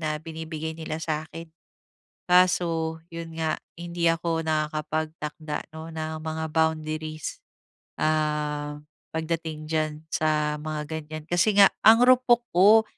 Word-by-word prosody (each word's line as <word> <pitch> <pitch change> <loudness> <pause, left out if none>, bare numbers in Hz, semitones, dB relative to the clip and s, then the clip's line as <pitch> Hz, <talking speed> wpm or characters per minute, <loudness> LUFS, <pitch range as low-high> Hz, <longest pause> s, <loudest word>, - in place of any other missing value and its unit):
na 155 -1 -1
binibigay 160 0 -5
nila 160 -1 -4
sa'kin. 160 +1 -4 0.8
Kaso, 175 -3 +3 0.2
'yon 165 -1 -7
nga 160 -1 0 0.2
hindi 170 0 -2
ako 165 0 -1
nakakapagtakda, 155 0 -2
'no, 160 +1 -7
ng 160 0 -4
mga 160 0 -3
boundaries. 155 -1 -1 0.6
Ah, 150 -1 0 0.4
pagdating 160 -1 -3
diyan, 155 -1 +1 0.2
sa 150 -1 +1
mga 155 0 -4
ganyan. 155 -1 -6
Kasi 175 +4 +2
nga, 200 -1 +8
ang 225 +2 +8
rupok 250 -1 +5
ko! 205 +5 +7
160 Hz, 115 wpm, -26 LUFS, 155-165 Hz, 0.8 s, nga